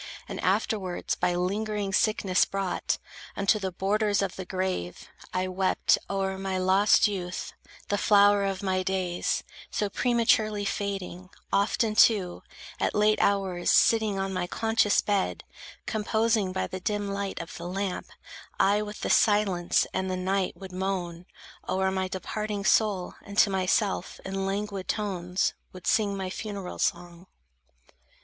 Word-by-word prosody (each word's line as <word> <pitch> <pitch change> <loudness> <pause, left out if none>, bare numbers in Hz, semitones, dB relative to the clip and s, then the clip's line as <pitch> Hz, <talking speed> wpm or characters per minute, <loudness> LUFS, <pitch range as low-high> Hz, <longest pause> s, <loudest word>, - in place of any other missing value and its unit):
And - - -5
afterwards, 190 -5 0
by 180 0 0
lingering 200 +2 -1
sickness 195 -3 +3
brought 195 -2 -1 0.4
Unto 200 +2 +2
the 190 -2 -3
borders 205 +2 +1
of 190 - -3
the 190 - -6
grave, 185 - -3 0.2
I 185 0 -1
wept 185 0 +2
O'er 195 -1 -1
my 190 -1 -2
lost 190 +4 +4
youth, 185 -3 -4 0.4
the 205 - +1
flower 205 -1 +5
of 195 0 -2
my 185 -1 +1
days, 185 -2 -1 0.3
So 205 -1 -2
prematurely 220 -4 +2
fading; 195 -3 -4 0.2
often, 215 +2 +2
too, 205 -5 +4 0.4
At - - 0
late 210 0 +3
hours 190 -3 +1
sitting 220 -3 +4
on 195 0 -2
my 180 -1 -2
conscious 220 +1 +2
bed, 200 -2 -1 0.4
Composing, 220 -2 +1
by 185 - -1
the 185 - -6
dim 205 +2 -2
light 200 0 -3
of 165 - -7
the 170 - -6
lamp, 195 0 -3 0.5
I 205 +2 +4
with 210 0 -7
the - - -2
silence 200 -5 +3
and 190 0 -1
the 185 - -1
night 190 +1 -1
would 190 -1 -9
moan 180 -2 -3 0.4
O'er 190 0 +1
my 190 0 -1
departing 205 +2 -4
soul, 205 -6 +2
and 200 0 -10
to 200 - +5
myself 190 0 0
In 195 0 -2
languid 200 -1 -3
tones 185 -3 -1 0.2
would 185 -1 -11
sing 200 -3 +2
my 190 -1 -4
funeral 200 -3 -6
song. 175 +1 -2
195 Hz, 145 wpm, -27 LUFS, 185-205 Hz, 0.5 s, flower